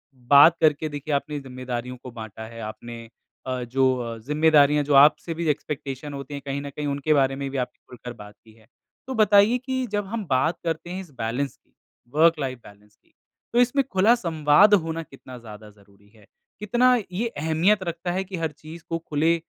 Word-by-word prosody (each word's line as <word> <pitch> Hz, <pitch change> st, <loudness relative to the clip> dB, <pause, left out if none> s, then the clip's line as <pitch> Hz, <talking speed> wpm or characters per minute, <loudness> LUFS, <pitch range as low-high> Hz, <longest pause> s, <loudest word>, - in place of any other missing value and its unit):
बात 140 Hz, +6 st, +6 dB
करके 155 Hz, 0 st, +2 dB
देखिए 145 Hz, +1 st, -5 dB
आपने 145 Hz, +1 st, -2 dB
जिम्मेदारियों 125 Hz, -1 st, -6 dB
को 125 Hz, -, -8 dB
बाँटा 110 Hz, -1 st, -9 dB
है 115 Hz, 0 st, -11 dB
आपने 115 Hz, +2 st, -8 dB, 0.4 s
अ, 130 Hz, -1 st, -3 dB
जो 130 Hz, +1 st, +1 dB
अ, 115 Hz, -1 st, -5 dB
जिम्मेदारियाँ 150 Hz, -1 st, +4 dB
जो 145 Hz, 0 st, -1 dB
आपसे 150 Hz, +4 st, +5 dB
भी 165 Hz, 0 st, -3 dB
एक्सपेक्टेशन 145 Hz, -1 st, -4 dB
होती 140 Hz, +1 st, -7 dB
हैं 140 Hz, -, -5 dB
कहीं 140 Hz, +1 st, -3 dB
न 140 Hz, -, -6 dB
कहीं 145 Hz, +1 st, -5 dB
उनके 140 Hz, +2 st, 0 dB
बारे 135 Hz, -1 st, +2 dB
में 140 Hz, 0 st, -4 dB
भी 135 Hz, -, -5 dB
आपने 125 Hz, -, -4 dB
खुलकर 125 Hz, -1 st, -9 dB
बात 105 Hz, 0 st, -14 dB
की 110 Hz, -1 st, -19 dB
है। 110 Hz, -1 st, -24 dB, 0.4 s
तो 265 Hz, -, -4 dB
बताइए 210 Hz, +2 st, +5 dB
कि 260 Hz, 0 st, -3 dB
जब 205 Hz, -1 st, -1 dB
हम 220 Hz, 0 st, -4 dB
बात 130 Hz, +6 st, +1 dB
करते 165 Hz, +1 st, -3 dB
हैं 185 Hz, +1 st, -5 dB
इस 175 Hz, -6 st, -13 dB
बैलेंस 120 Hz, +5 st, -3 dB
की, -, -, -41 dB, 0.4 s
वर्क 165 Hz, 0 st, +4 dB
लाइफ 130 Hz, -3 st, -3 dB
बैलेंस 105 Hz, +1 st, -18 dB
की -, -, -38 dB, 0.4 s
तो 240 Hz, -, +3 dB
इसमें 270 Hz, +3 st, +2 dB
खुला 200 Hz, +5 st, +4 dB
संवाद 165 Hz, +1 st, +4 dB
होना 165 Hz, -3 st, +1 dB
कितना 130 Hz, -3 st, -13 dB
ज़्यादा 105 Hz, -2 st, -12 dB
ज़रूरी 100 Hz, 0 st, -23 dB
है, 105 Hz, -, -20 dB, 0.3 s
कितना 245 Hz, +4 st, +3 dB, 0.2 s
ये 220 Hz, +6 st, -2 dB
अहमियत 165 Hz, +4 st, +1 dB
रखता 170 Hz, +1 st, -4 dB
है 190 Hz, +2 st, -1 dB
कि 190 Hz, -1 st, -7 dB
हर 160 Hz, -2 st, -2 dB
चीज़ 155 Hz, +3 st, -12 dB
को 165 Hz, -, -1 dB
खुले 160 Hz, +1 st, +1 dB
145 Hz, 200 wpm, -24 LUFS, 125-170 Hz, 0.4 s, बात